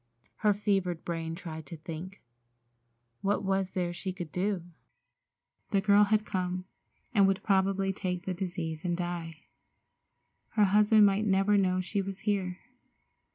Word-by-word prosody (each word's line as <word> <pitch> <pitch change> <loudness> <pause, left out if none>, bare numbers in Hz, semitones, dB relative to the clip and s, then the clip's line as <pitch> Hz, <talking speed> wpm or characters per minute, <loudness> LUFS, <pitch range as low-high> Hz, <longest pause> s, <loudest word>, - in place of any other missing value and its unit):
Her 210 - +3
fevered 195 -5 0
brain 165 -1 -3
tried 160 -3 -8
to 165 - -8
think. 165 +4 -8 1.0
What 200 +1 0
was 195 -1 0
there 175 -2 -1
she 185 +2 -4
could 175 -4 -7
do? 190 0 -1 1.1
The 200 - +2
girl 205 +1 +5
had 215 +1 +2
come, 185 -1 -2 0.5
and 200 -4 +5
would 195 0 0
probably 195 -1 +2
take 180 -2 -3
the 190 - -1
disease 170 -4 -4
and 175 -1 -1
die. 170 -2 -4 1.1
Her 210 - +4
husband 210 +2 +5
might 200 +2 +2
never 195 +1 +3
know 185 -2 +2
she 195 +2 -1
was 195 0 -6
here. 190 -4 -1
190 Hz, 145 wpm, -30 LUFS, 175-200 Hz, 1.1 s, girl